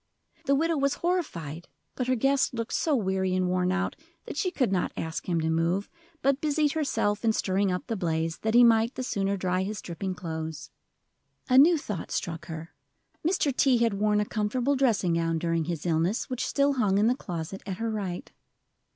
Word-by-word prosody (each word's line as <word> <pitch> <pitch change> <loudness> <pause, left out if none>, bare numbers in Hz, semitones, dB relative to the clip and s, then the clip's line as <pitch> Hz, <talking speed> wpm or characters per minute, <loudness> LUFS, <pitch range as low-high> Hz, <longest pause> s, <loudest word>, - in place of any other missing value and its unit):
The 280 - +4
widow 325 +2 +1
was 280 0 +1
horrified, 175 - -2 0.3
but 250 - -3
her 255 - +2
guest 270 +1 +2
looked 230 -1 -3
so 310 -3 +2
weary 190 -4 0
and 185 -1 +1
worn 180 0 +1
out 190 +1 -1 0.3
that - - -6
she 365 +5 0
could 255 - 0
not 185 -2 0
ask 160 +3 -4
him 170 -2 +1
to 160 - 0
move, 170 +5 0 0.3
but 275 +1 +2
busied 300 -1 +2
herself 255 -9 0
in 225 -1 +3
stirring 195 -1 +1
up 180 - -3
the 225 - -2
blaze 165 -3 -1
that 220 +1 0
he 245 - +8
might 230 +1 +4
the 260 - -3
sooner 200 -4 -1
dry 185 0 0
his 205 +2 -3
dripping 185 +2 -4
clothes. 160 -3 -6 0.8
A 255 - +5
new 330 +4 +7
thought 210 - -5
struck 170 0 -4
her: 160 0 -7 0.5
Mr. 310 -5 +1
T. 260 -2 +4
had 230 -2 +2
worn 210 +1 +2
a 210 - +1
comfortable 240 +7 0
dressing 225 -10 +2
gown 165 0 +1
during 165 -1 0
his 165 -1 -4
illness, 170 +9 0
which 255 0 -1
still 280 0 +2
hung 210 -7 +2
in 205 - +3
the 240 - +4
closet 180 - -6
at 190 -2 -3
her 230 +1 -2
right. 195 -5 -4
205 Hz, 200 wpm, -27 LUFS, 175-255 Hz, 0.8 s, he